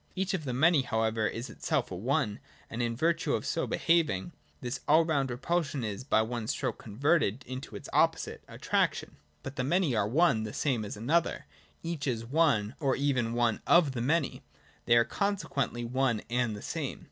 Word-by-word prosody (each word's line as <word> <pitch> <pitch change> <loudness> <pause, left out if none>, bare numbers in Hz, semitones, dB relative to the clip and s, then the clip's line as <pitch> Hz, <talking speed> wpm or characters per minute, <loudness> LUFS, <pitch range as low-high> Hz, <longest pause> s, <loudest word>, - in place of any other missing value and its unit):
Each 190 +1 -1
of 170 -6 -2
the 130 - -2
Many 155 +3 +4
however 110 -3 0
is 115 +4 -4
itself 145 -9 -2
a - - -4
One, 115 - -1 0.3
and 115 - -3
in 115 -1 -1
virtue 165 +2 +1
of - - -3
its - - -1
so 165 - -1
behaving, 165 - +1 0.3
this 125 0 -4
all 160 +2 +5
round 140 -5 0
repulsion 140 +1 -1
is 105 +1 -4
by 110 -5 +3
one 115 -1 -4
stroke - - -2
converted 130 +1 +1
into 130 +1 -7
its - - -8
opposite, - - +1
— - - -39
Attraction. - - 0
98.] - - -25 0.2
(y) - - -40
But 135 - -7
the 125 - 0
Many 160 -1 +1
are 105 -2 +1
one 140 -1 +3
the 110 -1 -5
same 130 -7 0
as 105 - -6
another: 155 +10 0 0.4
each 165 -4 -3
is 115 -3 -1
One, 130 -6 +2
or 140 -4 +1
even 130 -5 0
one 120 -2 +1
of 170 -5 +5
the 125 -3 -4
Many; 150 +3 0 0.4
they 120 - +5
are 115 - +5
con 200 0 0
sequently 120 -8 -3
one 125 -3 0
and 120 -3 0
the - - -10
same. - - -4
130 Hz, 205 wpm, -30 LUFS, 115-155 Hz, 0.4 s, all